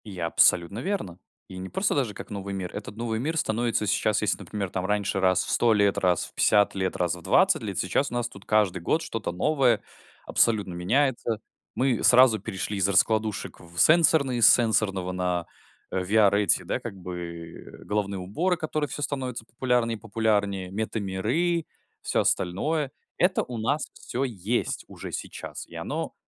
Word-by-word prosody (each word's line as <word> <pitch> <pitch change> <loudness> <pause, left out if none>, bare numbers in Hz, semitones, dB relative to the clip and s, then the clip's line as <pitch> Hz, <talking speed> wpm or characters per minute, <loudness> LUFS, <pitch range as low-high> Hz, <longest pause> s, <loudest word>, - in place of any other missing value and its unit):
И 100 -4 -8
абсолютно 85 +3 +3
верно. 130 - -3 0.3
И 95 - -9
не 95 +1 -6
просто 190 +1 0
даже 130 -7 0
как - - -9
новый 100 -1 -5
мир. 95 -2 -5
Этот 100 - -7
новый 115 -1 -2
мир 160 +6 -2
становится 115 -4 0
сейчас, 105 +1 +1
если, 105 -1 +1
например, 100 -3 -4
там 90 0 -3
раньше 100 -1 0
раз 95 -1 +3
в - - -7
100 120 -1 +3
лет, 100 -2 +2
раз 90 -3 +2
в - - -13
50 105 -1 +3
лет, 95 -1 -1
раз 90 -1 0
в 90 - -11
20 185 - +3
лет. 100 -5 -5
Сейчас 95 +9 0
у - - -7
нас 120 -1 -1
тут 100 -3 -14
каждый 100 -4 +2
год 155 - +1
что-то 115 - -4
новое 125 - +2 0.4
абсолютно 105 -5 +2
меняется. 115 +4 0 0.4
Мы 130 -2 +1
сразу 125 -3 +6
перешли 100 0 -4
из 95 -1 +2
раскладушек 110 +2 +1
в, 85 -1 -16
э, - - -12
сенсорные, 155 - +4
с - - +8
сенсорного 100 -5 +2
на, 90 -2 -1 0.5
э, 95 - -1
VR 100 +2 +4
эти, 100 -5 +2
да - - -2
как - - -7
бы 85 -2 -7 0.3
головные 100 -2 -2
уборы, 160 - -1
которые 155 -2 -2
всё 145 - -6
становятся 130 -5 -3
популярнее 120 -1 0
и - - -22
популярнее, 100 -4 0
мета-миры, 110 - -1 0.4
всё - - +1
остальное. 140 - 0 0.3
Это 180 +2 +2
у 125 - -7
нас 140 +8 -1
всё 125 - -4
есть 115 -2 -2
уже - - -9
сейчас, - - -7
и - - -14
оно - - -4
105 Hz, 180 wpm, -26 LUFS, 95-125 Hz, 0.5 s, с